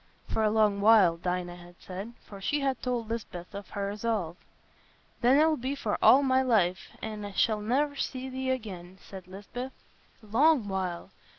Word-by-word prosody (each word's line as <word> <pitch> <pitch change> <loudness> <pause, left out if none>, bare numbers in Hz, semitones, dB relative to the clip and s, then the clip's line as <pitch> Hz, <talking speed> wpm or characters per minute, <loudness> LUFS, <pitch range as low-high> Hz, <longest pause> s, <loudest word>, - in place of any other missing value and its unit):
"For - - -1
a 215 - +3
long 210 -2 +2
while," 205 -6 +6
Dinah 175 0 -3
had 175 0 -14
said, 195 +5 -7
for 200 -2 -11
she 290 +9 0
had 270 -1 -1
told 245 -3 -2
Lisbeth 210 -5 -6
of 200 -1 -8
her 200 0 -3
resolve. 205 -5 -2 0.9
"Then 250 +3 +5
it'll 310 0 +4
be 260 +3 -3
for 220 -7 -2
all 275 +2 +7
my 260 -1 +3
life, 200 -8 +1
an' 215 -1 -5
I 205 -1 -6
shall 215 +1 +2
ne'er 280 +7 0
see 260 -1 -3
thee 260 0 -3
again," 190 -8 -4
said 190 -2 -11
Lisbeth. 205 +7 -7 0.5
"Long 245 +3 +3
while! 185 -3 -3
215 Hz, 175 wpm, -29 LUFS, 190-255 Hz, 0.9 s, all